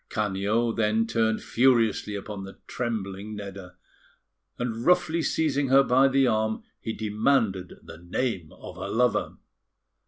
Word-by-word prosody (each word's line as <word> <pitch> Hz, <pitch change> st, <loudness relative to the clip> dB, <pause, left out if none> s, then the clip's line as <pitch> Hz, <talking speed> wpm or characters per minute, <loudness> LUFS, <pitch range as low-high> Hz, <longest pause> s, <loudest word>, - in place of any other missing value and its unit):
Canio 105 Hz, +3 st, 0 dB
then 110 Hz, 0 st, +1 dB
turned 110 Hz, -1 st, 0 dB
furiously 115 Hz, -4 st, +2 dB
upon 100 Hz, 0 st, -6 dB
the 95 Hz, 0 st, -10 dB
trembling 105 Hz, -3 st, -4 dB
Nedda; 95 Hz, -3 st, -8 dB, 0.8 s
and 115 Hz, -1 st, -3 dB
roughly 170 Hz, -1 st, +3 dB
seizing 145 Hz, -3 st, 0 dB
her 135 Hz, +1 st, +6 dB
by 130 Hz, +1 st, +4 dB
the 135 Hz, 0 st, +3 dB
arm, 110 Hz, -2 st, 0 dB, 0.2 s
he 110 Hz, -, -4 dB
demanded 105 Hz, -3 st, 0 dB
the 80 Hz, -, -11 dB
name 90 Hz, -1 st, -3 dB
of -, -, -11 dB
her -, -, -5 dB
lover. 125 Hz, +1 st, +1 dB
110 Hz, 130 wpm, -26 LUFS, 100-125 Hz, 0.8 s, her